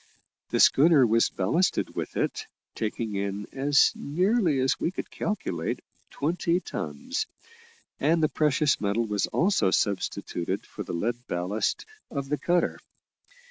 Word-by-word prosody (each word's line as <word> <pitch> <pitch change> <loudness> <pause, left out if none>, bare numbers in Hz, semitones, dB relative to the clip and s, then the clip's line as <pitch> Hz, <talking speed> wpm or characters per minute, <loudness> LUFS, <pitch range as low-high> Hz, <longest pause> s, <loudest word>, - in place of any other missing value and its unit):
The - - 0
schooner 145 -2 +6
was 115 0 +3
ballasted 160 - 0
with - - -4
it, - - -1 0.3
taking 110 0 -3
in, 100 +1 -3
as 145 +2 +4
nearly 180 - +1
as 130 0 +1
we - - 0
could 185 - -6
calculate, 90 - -2 0.3
twenty 170 +3 0
tons, 75 - -4 0.7
and 160 +3 +2
the - - +5
precious 150 -1 +1
metal 105 +3 +1
was 105 -2 0
also 170 - +2
substituted 95 -3 -1
for - - -9
the - - -6
lead 120 +7 -2
ballast 95 +5 -1 0.2
of 140 -2 -4
the 150 - 0
cutter. 175 0 +1
135 Hz, 135 wpm, -27 LUFS, 100-160 Hz, 0.7 s, schooner